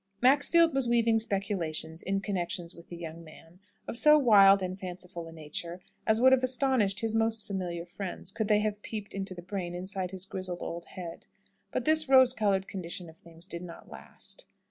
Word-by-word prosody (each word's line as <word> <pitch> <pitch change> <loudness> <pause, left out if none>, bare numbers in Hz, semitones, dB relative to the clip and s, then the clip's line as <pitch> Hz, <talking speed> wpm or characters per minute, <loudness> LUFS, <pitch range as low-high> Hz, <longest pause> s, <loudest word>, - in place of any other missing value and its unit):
Maxfield 290 +6 +5
was 270 -2 +1
weaving 230 -1 +3
speculations 190 -7 -2
in 195 +1 -1
connection 180 -3 -2
with 170 - -15
the 175 - -7
young 165 0 -8
man, 165 +2 -16 0.3
of 235 - -1
so 300 0 +7
wild 200 -7 +6
and 185 +1 -4
fanciful 180 -2 -7
a - - -10
nature 165 +2 -6 0.3
as 220 0 +4
would 260 +2 +6
have 265 -1 +5
astonished 255 -6 +2
his 225 -1 -1
most 225 -1 +1
familiar 175 -4 -4
friends, 185 0 -6
could 220 +1 -2
they 210 -1 +4
have 210 -1 -2
peeped 210 -2 -6
into 195 -1 -4
the 175 - -9
brain 180 -2 -4
inside 185 +1 -3
his 190 0 -2
grizzled 185 -2 -5
old 170 0 -5
head. 175 -3 -9 0.4
But - - -2
this 310 -2 +3
rose 260 -2 +7
coloured 200 -4 +1
condition 175 -2 -6
of 160 - -23
things 170 0 -11
did 170 -2 -5
not 175 -2 -11
last. - - -8
195 Hz, 190 wpm, -29 LUFS, 175-225 Hz, 0.4 s, so